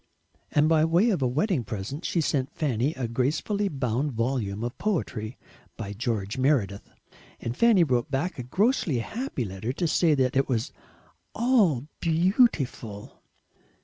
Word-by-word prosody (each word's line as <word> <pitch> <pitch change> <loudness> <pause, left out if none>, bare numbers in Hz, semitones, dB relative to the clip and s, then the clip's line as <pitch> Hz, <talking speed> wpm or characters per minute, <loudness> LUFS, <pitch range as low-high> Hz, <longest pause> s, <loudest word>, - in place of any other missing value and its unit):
And 150 +1 +3
by 160 -1 +4
way 175 +8 +3
of 180 - -1
a 130 - +3
wedding 150 - 0
present 110 - -5
she 170 - +1
sent 140 -3 -1
Fanny 140 0 0
a 125 -3 -2
gracefully 150 - 0
bound 135 - -1
volume 115 -3 -1
of 120 0 -3
poetry 130 - -2 0.4
by 100 -3 -5
George 105 0 -2
Meredith, 120 -8 +1 0.5
and 115 +1 -4
Fanny 225 - +5
wrote 125 -5 0
back 140 +4 -2
a - - -3
grossly 185 - +1
happy 205 - -3
letter 95 +4 -4
to 170 +4 -1
say 160 0 +3
that 130 -2 +1
it 135 +1 +2
was 115 -3 -1 0.6
"ALL 210 - +3
beautiful." 160 - +1
135 Hz, 145 wpm, -26 LUFS, 115-170 Hz, 0.6 s, Fanny